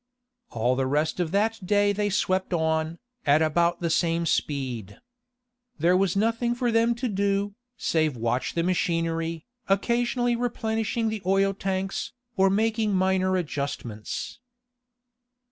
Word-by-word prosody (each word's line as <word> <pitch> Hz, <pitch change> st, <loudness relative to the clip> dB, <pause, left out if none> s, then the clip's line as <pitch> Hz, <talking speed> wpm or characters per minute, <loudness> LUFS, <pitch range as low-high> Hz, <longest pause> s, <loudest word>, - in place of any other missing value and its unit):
All 120 Hz, +2 st, +1 dB
the 130 Hz, 0 st, 0 dB
rest 150 Hz, +5 st, 0 dB
of 175 Hz, -3 st, 0 dB
that 215 Hz, +3 st, 0 dB
day 205 Hz, +2 st, +3 dB
they 205 Hz, 0 st, 0 dB
swept 185 Hz, -1 st, 0 dB
on, 160 Hz, 0 st, 0 dB, 0.3 s
at 150 Hz, +2 st, +4 dB
about 170 Hz, +3 st, +1 dB
the 170 Hz, -, 0 dB
same 170 Hz, 0 st, +1 dB
speed. 125 Hz, -, -2 dB, 0.8 s
There 175 Hz, +2 st, +3 dB
was 190 Hz, -1 st, +2 dB
nothing 230 Hz, +3 st, +1 dB
for 240 Hz, -1 st, 0 dB
them 230 Hz, +1 st, +3 dB
to 245 Hz, +2 st, -2 dB
do, 200 Hz, -1 st, 0 dB, 0.2 s
save 155 Hz, -5 st, 0 dB
watch 120 Hz, +3 st, -1 dB
the 170 Hz, -, +1 dB
machinery, 165 Hz, -2 st, -1 dB, 0.2 s
occasionally 240 Hz, +4 st, +1 dB
replenishing 225 Hz, -1 st, -1 dB
the 215 Hz, -2 st, -4 dB
oil 195 Hz, +1 st, +2 dB
tanks, 195 Hz, 0 st, -3 dB, 0.2 s
or 195 Hz, -2 st, +4 dB
making 215 Hz, 0 st, +1 dB
minor 185 Hz, 0 st, +2 dB
adjustments. 140 Hz, -, -4 dB
185 Hz, 130 wpm, -26 LUFS, 160-215 Hz, 0.8 s, at